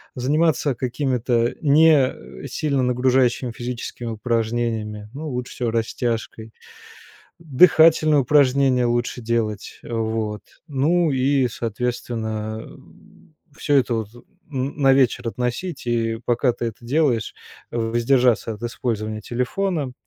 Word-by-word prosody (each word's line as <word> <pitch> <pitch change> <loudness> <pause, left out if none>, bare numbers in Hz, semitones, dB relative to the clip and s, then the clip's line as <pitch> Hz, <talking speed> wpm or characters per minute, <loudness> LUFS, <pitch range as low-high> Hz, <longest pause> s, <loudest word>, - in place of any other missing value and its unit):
заниматься 145 +1 +1
какими-то 125 -2 0
не 150 -3 +3
сильно 140 -1 -1
нагружающими 125 0 +1
физическими 120 0 -6
упражнениями, 110 -1 -2
ну, 150 +3 -6
лучше 125 -2 -5
всего 120 -2 -2
растяжкой, 115 -1 -3 0.9
дыхательные 160 0 +5
упражнения 135 -2 +3
лучше 120 +1 -1
делать, 110 -3 -2
э, - - -11
вот. 110 -2 -2 0.3
Ну 155 +4 +2
и, 135 0 +2
соответственно, 110 -2 -3
м, 155 - -18 0.2
всё 145 -2 +1
это 130 -3 +2
вот 110 -2 -3
н 135 -1 -7
на 135 -1 +6
вечер 125 -2 +2
относить, 125 +7 -4
и 115 -1 -1
пока 120 +1 +2
ты 120 0 -4
это 115 +2 -7
делаешь, 130 -4 0 0.4
в 115 -1 -2
воздержаться 120 -1 +2
от 105 - -11
использования 110 -3 -3
телефона. 140 +4 -2
125 Hz, 115 wpm, -22 LUFS, 115-140 Hz, 0.9 s, на